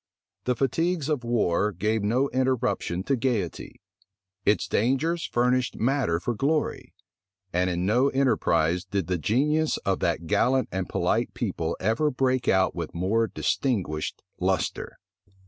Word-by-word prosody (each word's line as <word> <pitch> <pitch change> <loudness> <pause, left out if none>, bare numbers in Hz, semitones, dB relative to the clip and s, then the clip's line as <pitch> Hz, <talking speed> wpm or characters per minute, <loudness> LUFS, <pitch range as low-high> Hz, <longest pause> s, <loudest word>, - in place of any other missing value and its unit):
The 125 - +1
fatigues 160 +4 0
of 145 -5 0
war 105 -4 +1
gave 105 +4 -1
no 120 +7 +1
interruption 125 -8 0
to 135 - +1
gayety: 115 -8 -2 0.7
its 105 - +3
dangers 140 +9 0
furnished 125 +1 +1
matter 125 -8 +1
for 120 - -2
glory; 145 +7 -1 0.6
and 90 +1 +2
in 90 0 -1
no 120 +7 +3
enterprise 90 - +1
did 95 -1 -2
the 90 +1 -1
genius 150 - +1
of 95 -1 +1
that 85 0 -1
gallant 130 +10 +2
and 95 0 -3
polite - - 0
people - - -2
ever 115 +10 +1
break 130 -2 0
out 95 0 +3
with - - -5
more 105 +6 +1
distinguished 95 - -2 0.2
lustre. 95 -1 -1
115 Hz, 135 wpm, -26 LUFS, 95-135 Hz, 0.7 s, its